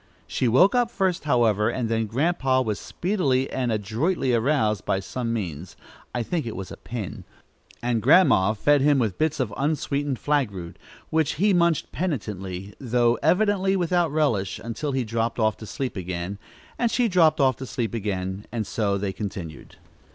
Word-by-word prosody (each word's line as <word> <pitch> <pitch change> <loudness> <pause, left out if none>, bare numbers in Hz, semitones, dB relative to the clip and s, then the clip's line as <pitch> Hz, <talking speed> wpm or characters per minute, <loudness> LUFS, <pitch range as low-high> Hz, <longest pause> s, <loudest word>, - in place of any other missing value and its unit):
She 125 - -1
woke 155 - +5
up 245 -2 +2
first, 190 -8 -1
however, 115 -6 +3
and 120 -1 -2
then 115 -1 0
Grandpa 135 +1 +1
was 105 -4 -2
speedily 145 -9 0
and 125 -2 -1
adroitly 120 - 0
aroused 115 -4 +1
by 95 - 0
some 115 +5 -4
means, 90 -6 -4 0.4
I 120 - 0
think 160 +1 -2
it 115 - -5
was 95 0 -6
a - - -8
pin; 115 -6 -6 0.6
and 120 -2 0
Grandma 130 - +5
fed 145 +6 +3
him 145 0 +4
with 110 -7 -1
bits 155 -1 +1
of 115 -6 -1
unsweetened 145 -1 -1
flag 145 -4 +1
root, 90 -4 -8 0.3
which 160 -2 +2
he 200 +5 +2
munched 170 -3 +2
penitently, 100 - -4
though 120 -2 +2
evidently 195 -1 +2
without 175 -3 +1
relish, 115 -12 0
until 115 +6 -3
he 130 -1 0
dropped 115 +1 -2
off 110 -2 +2
to 110 - -9
sleep 130 +3 -4
again, 90 +1 -4 0.4
and 235 - +2
she 240 +1 +2
dropped 165 -6 +4
off 130 -2 +4
to 130 - -7
sleep 120 -4 -3
again, 95 -2 -3
and 115 -3 -2
so 100 -1 0
they 100 -1 -2
continued. 95 - -7
120 Hz, 175 wpm, -24 LUFS, 105-155 Hz, 0.6 s, woke